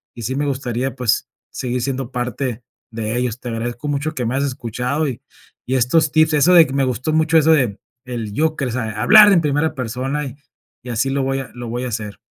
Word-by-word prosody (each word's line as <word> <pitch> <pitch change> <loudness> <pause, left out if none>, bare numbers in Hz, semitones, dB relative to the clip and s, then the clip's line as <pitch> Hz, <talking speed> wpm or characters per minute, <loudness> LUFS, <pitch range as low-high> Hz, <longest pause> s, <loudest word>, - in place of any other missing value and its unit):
y 120 - -8
sí 130 +5 -2
me 145 +1 -1
gustaría, 130 -1 -2
pues, 125 -4 0 0.2
seguir 125 -1 -3
siendo 130 0 -3
parte 125 -1 -3 0.3
de 110 0 -3
ellos. 125 -1 -2
Te 125 - -6
agradezco 120 +5 -4
mucho 145 +3 -2
que 125 -4 -2
me 120 +3 -1
has 140 - 0
escuchado 125 +3 -2
y 125 -1 -7 0.5
y 130 - 0
estos 140 +5 +2
tips, 155 0 +3
eso 150 +5 +4
de 165 -2 +8
me 140 - +1
gustó 130 +4 -2
mucho 160 +1 +3
eso 160 +1 +5
de 125 -10 +1 0.3
del 115 -4 -5
yo 155 +6 +1
que, 140 - -1
o 125 - -2
sea, 115 -2 -2
hablar 210 0 +8
en 175 - +4
primera 150 +1 0
persona 130 +4 -3
y 130 -1 -7 0.5
y 125 - -9
así 120 +3 0
lo 140 - 0
voy 135 0 -1
a 135 - -7
lo 120 -1 -7
voy 120 +2 -3
a - - -3
hacer. 105 -3 -5
130 Hz, 230 wpm, -19 LUFS, 120-145 Hz, 0.5 s, de